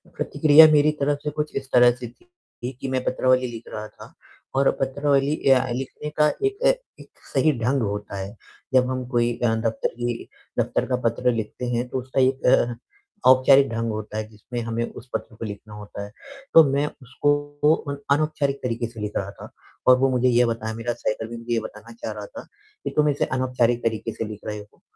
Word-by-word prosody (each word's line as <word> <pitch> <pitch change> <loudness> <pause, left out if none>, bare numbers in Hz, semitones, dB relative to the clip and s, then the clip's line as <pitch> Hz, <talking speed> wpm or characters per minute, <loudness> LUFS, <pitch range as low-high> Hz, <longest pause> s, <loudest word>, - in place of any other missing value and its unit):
प्रतिक्रिया 155 +2 +6
मेरी 150 0 +5
तरफ़ 145 +1 +1
से 150 - -1
कुछ 150 0 -2
इस 135 -1 -4
तरह 125 0 +7
से 120 0 -7
थी 125 - -20 0.3
ये 125 - -2
कि 135 - -3
मैं 130 -1 -1
पत्रावली 130 0 +2
लिख 115 -1 -8
रहा 105 0 -5
था - - -15 0.4
और 135 0 +4
पत्रावली 140 +1 +1 0.2
अ, 130 0 +4
लिखने 135 +4 -5
का 150 0 +5 0.2
एक 405 0 0 0.4
एक - - -13 0.2
सही 155 - +4
ढंग 125 +4 +1
होता 105 -2 -3
है। 95 +3 -6 0.4
जब 125 -1 +4
हम 130 -1 -3
कोई 120 -1 +2
अ, 115 -2 +1
दफ़्तर 110 0 -1
की 120 -1 -3 0.3
दफ़्तर - - 0
का 130 - +1
पत्र 125 +2 +1
लिखते 115 +1 -4
हैं 120 +1 -1
तो 130 - -2
उसका 130 +1 -1
एक 130 +1 +1
अ, 120 -1 +4 0.5
औपचारिक 135 +2 +6
ढंग 115 0 -2
होता 110 0 -5
है, 110 0 -3
जिसमें 110 +3 -7
हमें 115 0 -2
उस 125 - -12
पत्र 115 - -4
को 115 - -6
लिखना 105 0 -8
होता 105 -1 -8
है। 100 - -12 0.4
तो 165 - +10
मैं 140 +1 +2 0.2
उसको 145 +4 +1
अ, 140 -3 -6 0.2
अनौपचारिक 145 -2 -1
तरीके 120 -1 -2
से 115 -1 -12
लिख 105 0 -3
रहा 100 0 -3
था - - -9 0.4
और 130 0 +8
वो 135 +1 +3
मुझे 125 0 +2
यह 120 0 +4
बताया 110 -1 -3
मेरा 115 +1 -2
सहकर्मी 115 +1 -4
मुझे 115 +1 -4
यह 115 - +1
बताना 110 +1 -10
चाह 115 -1 -6
रहा 105 -1 -7
था - - -11 0.4
कि - - -2
तुम 150 0 +4
इसे 145 - +1
अनौपचारिक 125 -2 0
तरीके 110 0 -1
से 115 - -4
लिख 105 -1 -8
रहे 105 0 -4
हो 105 0 -16
125 Hz, 205 wpm, -23 LUFS, 115-135 Hz, 0.5 s, तो